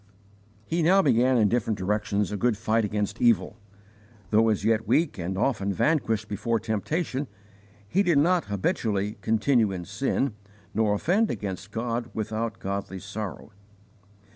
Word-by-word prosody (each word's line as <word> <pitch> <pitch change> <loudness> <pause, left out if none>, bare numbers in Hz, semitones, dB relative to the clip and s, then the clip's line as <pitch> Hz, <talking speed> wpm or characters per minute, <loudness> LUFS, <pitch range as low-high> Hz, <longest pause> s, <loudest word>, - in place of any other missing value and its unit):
He 170 +6 -1
now 190 +4 +5
began 125 -2 +3
in 110 -3 +4
different 110 -1 0
directions 105 +1 -1
a - - -2
good 115 +1 +1
fight 115 +1 +1
against 105 -1 -2
evil. 110 -3 +3 0.7
Though 110 +1 +4
as 105 -2 0
yet 110 -1 +2
weak 145 - +1
and 90 +2 -3
often 100 -3 0
vanquished 110 - +1
before 115 +3 -1
temptation, 130 - -2 0.6
he 190 - +2
did 175 -6 +3
not 175 +4 +3
habitually 100 +1 -1
'continue 110 +1 +2
in 90 -2 -5
sin,' 115 +5 -1 0.4
nor 105 -1 +2
offend 195 - +2
against 95 -1 -5
God 115 +2 -3
without 110 0 -3
godly 100 0 -4
sorrow. 100 +2 -6
110 Hz, 140 wpm, -26 LUFS, 100-125 Hz, 0.7 s, now